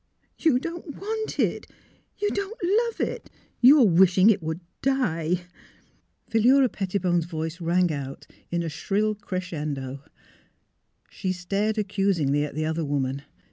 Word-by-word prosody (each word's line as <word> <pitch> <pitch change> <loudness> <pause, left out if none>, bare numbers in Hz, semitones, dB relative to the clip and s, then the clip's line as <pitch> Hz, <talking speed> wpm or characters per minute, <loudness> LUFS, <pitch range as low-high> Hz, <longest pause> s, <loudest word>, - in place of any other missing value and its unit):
" - - -42
You 295 -6 +5
don't 335 +1 -6
want 440 +2 -3
it! - - 0 0.5
You 415 0 0
don't 400 +3 -3
love 450 +6 +1
it! 485 - -7 0.3
You 275 +4 +8
are - - +7
wishing 185 +2 +6
it 200 -3 0
would 160 +2 -4 0.2
die! 180 -11 0 0.4
" - - -40
Philura 250 +4 +5
Pettibone 185 -4 0
's - - -5
voice 160 0 -5
rang 175 +1 +2
out 135 -1 -6 0.2
in 170 0 -1
a - - -3
shrill 205 +6 0
crescendo. 150 -9 -5 1.1
She 185 - -3
stared 200 +4 -1
accusingly 190 -8 +1
at 150 - -5
the 155 0 -1
other 160 +1 -1
woman. 140 -2 -1
185 Hz, 145 wpm, -25 LUFS, 160-245 Hz, 1.1 s, You